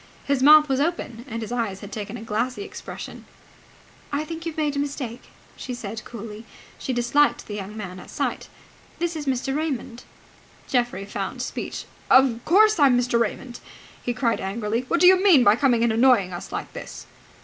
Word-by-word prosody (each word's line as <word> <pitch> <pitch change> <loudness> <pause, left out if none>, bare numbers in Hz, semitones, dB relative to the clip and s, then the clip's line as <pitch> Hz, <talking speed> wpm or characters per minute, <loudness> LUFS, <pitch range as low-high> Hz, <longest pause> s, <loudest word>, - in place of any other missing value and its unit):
His 280 -2 +1
mouth 300 +2 +8
was 270 -1 0
open, 280 -7 -2
and 230 -1 -4
his 220 - -7
eyes 225 -6 -2
had 205 - -9
taken 210 -2 -5
a - - -9
glassy 230 - -2
expression. 410 - -8 0.9
"I 285 +1 -1
think 330 +1 -6
you - - -2
have 315 - -17
made 300 -2 0
a - - -1
mistake," 270 -4 -4 0.3
she 250 - -6
said 220 -2 -6
coldly. 220 -1 -8 0.4
She - - -3
disliked 255 +4 +2
the 210 - -7
young 205 +1 -6
man 185 -3 -6
at - - -12
sight. - - -3 0.5
"This 345 0 -2
is 300 -2 -5
Mr. 270 +1 -1
Raymond." 270 -6 -3 0.7
Geoffrey 240 -7 0
found 200 - -4
speech. - - -5 0.2
"Of 255 -3 +5
course 425 +2 +5
I'm 270 -4 +6
Mr. 245 -1 +1
Raymond!" 240 +2 -3 0.4
he 245 - -2
cried 240 -2 0
angrily. 215 +4 -2
"What 340 - +1
do - - +7
you 370 0 +7
mean 340 -11 +7
by 205 -2 +6
coming 245 -2 +2
and 235 -1 +2
annoying 225 -6 +4
us 175 - -7
like - - -5
this?" - - -8
245 Hz, 190 wpm, -24 LUFS, 225-290 Hz, 0.9 s, mouth